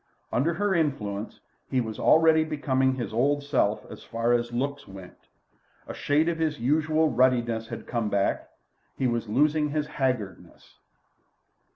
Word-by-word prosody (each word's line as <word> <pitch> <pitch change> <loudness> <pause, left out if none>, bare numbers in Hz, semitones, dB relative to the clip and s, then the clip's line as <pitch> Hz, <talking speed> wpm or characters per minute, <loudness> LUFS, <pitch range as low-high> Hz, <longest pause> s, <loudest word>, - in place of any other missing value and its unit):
Under 160 +7 +1
her 205 0 0
influence 115 - -2 0.3
he 130 - +1
was 110 -3 -4
already 160 0 +5
becoming 135 -4 0
his 120 -4 -5
old 140 +5 +1
self 110 -7 0
as - - -11
far 115 +1 0
as 120 0 0
looks 140 +4 -3
went. 95 -2 -13 0.6
A - - -6
shade 150 +3 +1
of 170 -1 -1
his 155 -2 -1
usual 155 +4 +2
ruddiness 120 -3 +1
had - - -7
come 115 -3 -2
back; 100 -1 -1 0.5
he 135 - -1
was 120 -3 -1
losing 150 +5 +2
his 150 0 -1
haggardness. 130 -9 -4
130 Hz, 150 wpm, -26 LUFS, 115-150 Hz, 0.6 s, already